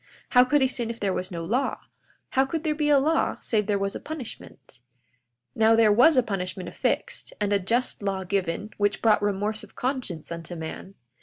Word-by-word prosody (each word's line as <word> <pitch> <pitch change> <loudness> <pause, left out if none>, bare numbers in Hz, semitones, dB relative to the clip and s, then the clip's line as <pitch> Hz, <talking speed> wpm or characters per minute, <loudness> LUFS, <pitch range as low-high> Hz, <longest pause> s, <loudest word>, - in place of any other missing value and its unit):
How 250 -1 +7
could 285 +3 +2
he - - +4
sin 240 -3 -2
if 230 0 -5
there 195 -2 0
was 185 0 -3
no 170 -2 -5
law? 250 +9 -1 0.5
How 265 - +3
could 310 +4 -3
there 310 -2 +1
be 300 0 0
a 290 - +6
law 310 +4 +1
save 210 -3 0
there 205 -1 +2
was 195 0 -2
a - - -5
punishment? 225 - -9 0.8
42:18 - - -14
Now, 225 0 +5
there 225 -2 +5
was 260 +7 +6
a 255 - +5
punishment 185 -4 -4
affixed, - - -2
and 205 -1 0
a 200 - +3
just 230 +7 -1
law 195 -1 -2
given, 190 +2 -2
which 205 -1 +1
brought 220 -2 +4
remorse 205 +1 -1
of - - -15
conscience 245 - -3
unto 170 +1 -6
man. 165 +4 -7
210 Hz, 210 wpm, -26 LUFS, 190-255 Hz, 0.8 s, How